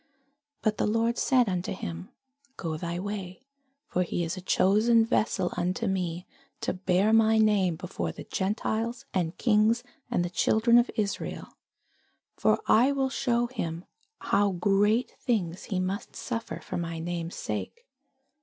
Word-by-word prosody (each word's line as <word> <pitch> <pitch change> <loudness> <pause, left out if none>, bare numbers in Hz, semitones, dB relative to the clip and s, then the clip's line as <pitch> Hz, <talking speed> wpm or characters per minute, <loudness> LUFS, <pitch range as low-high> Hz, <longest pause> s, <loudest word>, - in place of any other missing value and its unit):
But 215 -1 +1
the - - +2
Lord 230 +2 +1
said 255 -3 +3
unto 180 -1 -2
him, 85 - -6 0.5
Go 160 -3 -3
thy 170 +2 -4
way: 195 +2 -5 0.4
for 180 - -1
he 175 0 -1
is 165 +2 -2
a 185 - -7
chosen 220 +5 +4
vessel 205 -5 +1
unto 185 +7 -1
me, 180 -3 -2 0.4
to - - -1
bear 190 +3 +2
my 225 0 +5
name 205 -5 +3
before 180 +3 -4
the - - -9
Gentiles, 220 +4 -2
and 175 -3 -1
kings, 225 0 +3 0.3
and 175 -8 +1
the 175 - -5
children 230 +5 +4
of 240 - +1
Israel: 205 -2 -3 0.9
for - - +2
I 250 +5 +5
will 270 -1 0
shew 240 -3 +1
him 175 -9 -4 0.3
how 200 0 +1
great 205 +6 +2
things 190 -8 -1
he 190 -4 -2
must 190 +4 -3
suffer 230 -2 -4
for - - -5
my 165 -1 -3
name's 170 0 -4
sake. 475 +1 -5
200 Hz, 150 wpm, -28 LUFS, 180-230 Hz, 0.9 s, my